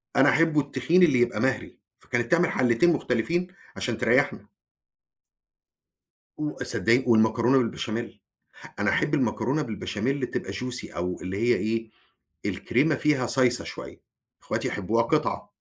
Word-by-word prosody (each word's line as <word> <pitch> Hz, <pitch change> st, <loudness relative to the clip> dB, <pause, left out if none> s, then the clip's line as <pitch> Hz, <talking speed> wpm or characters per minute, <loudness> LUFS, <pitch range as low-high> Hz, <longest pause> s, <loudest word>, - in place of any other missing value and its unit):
أنا 135 Hz, +1 st, +5 dB
أحبّه 160 Hz, -1 st, +3 dB
التخين 165 Hz, +5 st, +2 dB
اللي 145 Hz, -8 st, +4 dB
يبقى 120 Hz, 0 st, +1 dB
مَهْري. 130 Hz, -1 st, -1 dB, 0.2 s
فكانت 120 Hz, -1 st, -3 dB
تعمل 170 Hz, 0 st, +3 dB
حَلّتين 125 Hz, +8 st, +3 dB
مُختلفين 165 Hz, +11 st, -1 dB, 0.3 s
عشان -, -, -3 dB
تريّحنا. -, -, +1 dB, 1.9 s
و 150 Hz, -4 st, -4 dB
صدّقيني 125 Hz, +1 st, +1 dB
والمكرونة 115 Hz, +3 st, +3 dB
بالبشاميل. 115 Hz, -1 st, -3 dB, 0.6 s
أنا -, -, +1 dB
أحب 150 Hz, -, 0 dB
المكرونة 130 Hz, +2 st, 0 dB
بالبشاميل 125 Hz, +2 st, -3 dB
تبقى -, -, -4 dB
Juicy 125 Hz, 0 st, -6 dB
أو 90 Hz, +1 st, -3 dB
اللي 95 Hz, +2 st, -4 dB
هي 120 Hz, +3 st, +2 dB
إيه 115 Hz, +1 st, -2 dB, 0.6 s
الكريمة 155 Hz, 0 st, +1 dB
فيها 140 Hz, -2 st, +1 dB
صايصة 125 Hz, -1 st, +2 dB
شويّة. -, -, -9 dB, 0.4 s
إخواتي -, -, -2 dB
يحبوها -, -, 0 dB
قِطع. -, -, -1 dB
125 Hz, 125 wpm, -25 LUFS, 115-150 Hz, 1.9 s, أنا